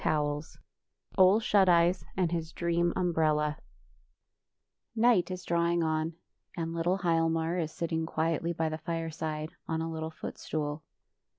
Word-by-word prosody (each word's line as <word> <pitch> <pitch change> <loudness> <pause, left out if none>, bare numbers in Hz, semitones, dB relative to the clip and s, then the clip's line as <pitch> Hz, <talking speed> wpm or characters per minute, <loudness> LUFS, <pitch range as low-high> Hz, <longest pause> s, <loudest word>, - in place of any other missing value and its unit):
31 150 -1 +1 0.4
] - - -29
OLE 190 +3 +7
SHUT 200 -4 +4
EYES 175 +1 +4
AND 180 -3 +1
HIS 165 -2 -3
DREAM 170 0 +1
UMBRELLA 155 -4 +1 1.4
N 225 - +3
ight 225 -8 +4
is 185 -1 -5
drawing 170 0 +1
on, 160 0 -1 0.4
and 165 -1 -2
little 170 +3 +1
Hial 165 -1 +3
mar 165 +2 0
is 160 -2 -2
sitting 160 -1 -2
quietly 165 +1 0
by 165 -1 -1
the 155 0 -3
fireside, 160 -1 -3 0.2
on 160 0 -1
a 165 0 -3
little 160 0 -4
footstool. 150 -1 -4
165 Hz, 150 wpm, -30 LUFS, 160-170 Hz, 1.4 s, OLE